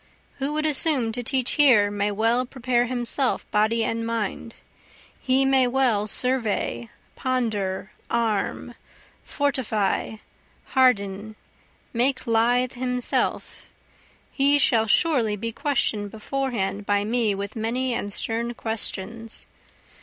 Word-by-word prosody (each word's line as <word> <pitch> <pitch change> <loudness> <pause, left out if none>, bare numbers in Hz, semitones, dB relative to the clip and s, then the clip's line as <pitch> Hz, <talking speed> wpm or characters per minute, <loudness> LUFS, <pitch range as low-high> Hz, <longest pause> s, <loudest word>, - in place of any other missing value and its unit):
Who 275 +2 -1
would 310 0 -1
assume 285 -5 +1
to 245 - -4
teach 255 0 -1
here 235 -9 +5
may 205 0 0
well 225 +4 +2
prepare 245 -1 0
himself 250 +2 0
body 220 +2 +2
and 230 +1 -2
mind, 230 0 -3 0.6
He 265 +1 +2
may 265 -1 +4
well 245 -5 +1
survey, 215 - 0 0.3
ponder, 210 -6 -2 0.2
arm, 225 -4 -1 0.5
fortify, 230 -8 -1 0.6
harden, 215 -5 +1 0.6
make 255 +3 +1
lithe 240 +2 +2
himself, 250 0 -2 0.6
He 280 +1 +4
shall 230 -5 +3
surely 235 -4 +2
be 230 +3 -4
question'd 220 -6 -1
beforehand 220 -3 -3
by 205 0 +1
me 220 -1 +1
with 200 +1 -5
many 240 +3 -1
and 205 -3 -3
stern 235 +3 -2
questions. 225 0 -4
230 Hz, 110 wpm, -24 LUFS, 210-255 Hz, 0.6 s, here